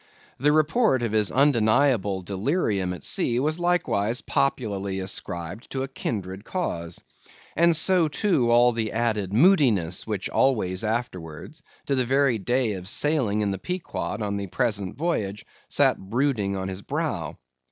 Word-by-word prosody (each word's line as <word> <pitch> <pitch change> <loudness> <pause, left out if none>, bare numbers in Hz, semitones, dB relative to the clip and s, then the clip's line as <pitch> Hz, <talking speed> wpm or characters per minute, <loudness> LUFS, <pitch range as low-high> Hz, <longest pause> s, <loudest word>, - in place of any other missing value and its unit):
The 145 +4 +3
report 155 - +2
of 115 - -1
his 105 -2 +2
undeniable 115 -6 +2
delirium 100 - -1
at 90 - -7
sea 120 0 +1
was 155 +5 0
likewise 125 - 0
popularly 100 -8 -1
ascribed 90 +1 -5
to 135 -1 -3
a - - -3
kindred 100 -7 -5
cause. 85 - -4 0.5
And 170 +1 +4
so 175 +1 +3
too, 150 - +1
all 120 +1 +5
the 115 -2 -3
added 110 -4 -1
moodiness 115 - +3
which 105 -4 -2
always 105 -7 +1
afterwards, 110 - -4 0.2
to 140 - -1
the 130 -2 +2
very 135 -2 +2
day 120 +2 0
of 95 -1 -4
sailing 130 -9 +2
in 100 -1 0
the 95 - -4
Pequod 180 - -4
on 100 -1 -2
the 100 -1 -4
present 105 -3 -2
voyage, 110 - -2 0.2
sat - - +3
brooding 105 -2 -1
on 95 0 -3
his 95 0 -5
brow. - - -3
115 Hz, 150 wpm, -25 LUFS, 100-140 Hz, 0.5 s, all